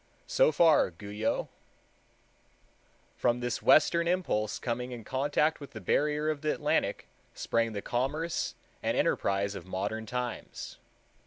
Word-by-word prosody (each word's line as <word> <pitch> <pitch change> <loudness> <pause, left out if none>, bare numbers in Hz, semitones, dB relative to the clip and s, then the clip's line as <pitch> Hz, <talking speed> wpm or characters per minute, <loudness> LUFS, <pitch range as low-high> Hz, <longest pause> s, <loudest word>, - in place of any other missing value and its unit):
So - - +4
far 165 - +5
Guyot. 105 +5 -2 1.7
From 120 0 +2
this 125 -1 -2
western 170 +2 +5
impulse 170 - 0
coming 125 +1 -3
in 120 -2 -7
contact 145 +5 +1
with 140 - -10
the 110 - -6
barrier 150 - +1
of 150 -2 -5
the 155 -1 +1
Atlantic - - 0 0.3
sprang 115 -1 0
the 100 - -4
commerce 150 +7 -1 0.3
and - - 0
enterprise 100 0 +1
of 95 - -8
modern 100 +4 -3
times. 125 +1 -5
125 Hz, 130 wpm, -30 LUFS, 110-150 Hz, 1.7 s, far